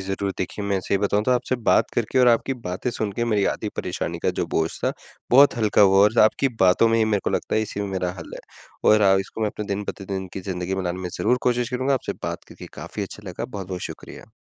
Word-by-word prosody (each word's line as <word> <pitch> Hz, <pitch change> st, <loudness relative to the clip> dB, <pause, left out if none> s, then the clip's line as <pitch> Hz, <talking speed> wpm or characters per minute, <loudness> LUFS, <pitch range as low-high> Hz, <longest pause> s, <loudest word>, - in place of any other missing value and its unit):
ज़रूर 95 Hz, +1 st, -2 dB
देखिए 100 Hz, +2 st, -4 dB
मैं 100 Hz, -1 st, 0 dB
सही 100 Hz, -, 0 dB
बताऊँ 100 Hz, +1 st, +1 dB
तो 130 Hz, -, +1 dB
आपसे 125 Hz, +1 st, +1 dB
बात 115 Hz, -, +2 dB
करके 120 Hz, +3 st, 0 dB
और 125 Hz, -, +6 dB
आपकी 120 Hz, +3 st, +2 dB
बातें 105 Hz, +1 st, -4 dB
सुन 110 Hz, -3 st, -3 dB
के 120 Hz, +4 st, -1 dB
मेरी 105 Hz, -4 st, +1 dB
आधी 105 Hz, -, -5 dB
परेशानी 85 Hz, -1 st, -3 dB
का -, -, 0 dB
जो -, -, 0 dB
बोझ 80 Hz, 0 st, +2 dB, 0.2 s
था -, -, +1 dB, 0.4 s
बहुत 140 Hz, +1 st, +6 dB
हल्का 105 Hz, -2 st, +2 dB
हुआ 95 Hz, 0 st, +5 dB
और 110 Hz, +3 st, +2 dB
आपकी 135 Hz, +5 st, +3 dB
बातों 95 Hz, +5 st, +5 dB
में 115 Hz, 0 st, +2 dB
ही 110 Hz, -, +4 dB
मेरे 105 Hz, -2 st, +1 dB
को -, -, 0 dB
लगता -, -, -1 dB
है 110 Hz, -, +3 dB
इसी 105 Hz, -1 st, -5 dB
में 100 Hz, -, -2 dB
मेरा 95 Hz, -2 st, -2 dB
हल 80 Hz, -, -9 dB
है -, -, -8 dB, 0.5 s
और 105 Hz, 0 st, +5 dB
आ 95 Hz, -1 st, +6 dB
इसको 95 Hz, -, -8 dB
मैं 110 Hz, -, +1 dB
अपने 105 Hz, 0 st, -6 dB
दिन 100 Hz, 0 st, -3 dB
प्रतिदिन 95 Hz, -1 st, -5 dB
की -, -, -5 dB
ज़िंदगी 95 Hz, 0 st, -3 dB
में 95 Hz, -, -2 dB
लाने 90 Hz, +1 st, -2 dB
में 90 Hz, -, -4 dB
ज़रूर 125 Hz, -, +2 dB
कोशिश 125 Hz, 0 st, +1 dB
करूँगा। 130 Hz, +2 st, +1 dB
आपसे 130 Hz, -, -3 dB
बात -, -, -4 dB
करके -, -, -11 dB
काफ़ी 105 Hz, -, -6 dB
अच्छा 100 Hz, +1 st, -8 dB
लगा, 90 Hz, -, -5 dB
बहुत-बहुत 95 Hz, -5 st, -6 dB
शुक्रिया। -, -, -11 dB
105 Hz, 255 wpm, -23 LUFS, 95-115 Hz, 0.5 s, और